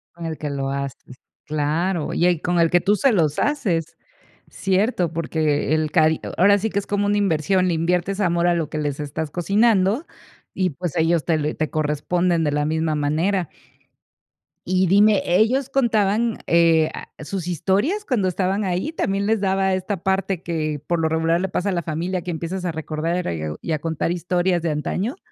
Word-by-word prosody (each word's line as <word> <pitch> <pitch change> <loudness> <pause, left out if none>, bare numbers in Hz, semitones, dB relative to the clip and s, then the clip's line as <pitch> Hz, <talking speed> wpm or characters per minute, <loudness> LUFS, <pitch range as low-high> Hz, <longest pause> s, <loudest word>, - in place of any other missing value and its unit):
Con 170 -1 -7
el 160 -1 -4
que 150 - -4
lo 135 -1 -2
haces. 140 -2 -6 0.3
Claro, 155 +3 -1
y 175 - +1
el 175 -3 +2
con 175 -1 0
el 165 -1 +4
que 175 -1 +3
tú 205 +1 +3
se 270 +5 +3
los 155 -7 +1
haces. 185 - -1 0.6
Cierto, 190 -3 0
porque 155 -2 0
el 155 -1 0
cari 160 -1 +3 0.2
ahora 200 +3 +6
sí 220 +2 -2
que 200 - -1
es 200 - -4
como 205 0 0
una 205 0 +2
inversión, 185 0 +1
le 170 - +1
inviertes 180 +4 0
amor 175 -2 +2
a 175 - +3
lo 165 -3 -2
que 155 - -3
les 145 -1 -2
estás 150 +1 -4
cocinando 200 - +2 0.5
y, 185 -2 0
pues, 170 +2 -5
ellos 165 0 +2
te 165 -2 +2
lo 150 0 -2
te 155 -1 -2
corresponden 165 +3 0
de 145 - 0
la 145 0 0
misma 160 0 0
manera. 165 +5 0 1.2
Y 185 0 +2
dime, 205 +2 +5
¿ellos 235 +9 +2
contaban, 225 -3 +1
eh 165 -2 +4
a - - -8 0.2
sus 180 +1 -4
historias 200 - 0
cuando 230 - 0
estaban 190 +2 0
ahí? 185 - -1
¿También 200 -9 -1
les 220 0 +1
daba 190 -1 +1
esta 185 0 -3
parte 190 -2 -1
que, 155 -3 -2
por 170 -1 0
lo 160 - +1
regular 160 +1 +1
le 190 - -1
pasa 185 +2 -2
a - - 0
la 170 -2 -1
familia, 175 +3 -2
que 175 - -5
empiezas 175 +3 -4
a 170 - -2
recordar 160 - -2
y 80 -1 -4
o 75 0 -5
y 165 - -4
a 155 - 0
contar 165 +1 -2
historias 175 0 0
de 165 -2 -1
antaño? 190 - -2
175 Hz, 195 wpm, -22 LUFS, 155-195 Hz, 1.2 s, ahora